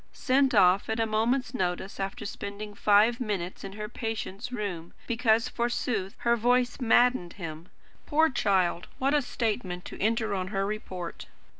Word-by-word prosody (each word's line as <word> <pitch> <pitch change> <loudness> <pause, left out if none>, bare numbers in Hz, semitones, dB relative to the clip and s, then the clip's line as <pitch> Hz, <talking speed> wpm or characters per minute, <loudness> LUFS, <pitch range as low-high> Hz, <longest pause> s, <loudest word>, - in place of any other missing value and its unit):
sent 265 -1 +2
off 190 0 +5
at 220 +1 -1
a 225 - +3
moment's 230 +4 0
notice, 185 -2 -2
after 195 0 -4
spending 205 +1 -6
five 210 +4 +4
minutes 200 -7 -3
in 195 - -7
her 210 +1 -5
patient's 225 0 -5
room, 195 -8 -4
because, 230 -1 +2
forsooth, 235 -4 -2
her 235 0 +2
voice 245 +2 +2
maddened 245 -6 +3
him! 165 -2 -8 0.4
Poor 315 +1 +4
child! 190 - +1
What 275 +2 +1
a 295 - +4
statement 210 -8 -2
to - - -8
enter 220 0 +1
on 185 -2 -2
her 195 0 -1
report! 185 -4 -5
215 Hz, 155 wpm, -28 LUFS, 195-240 Hz, 0.4 s, off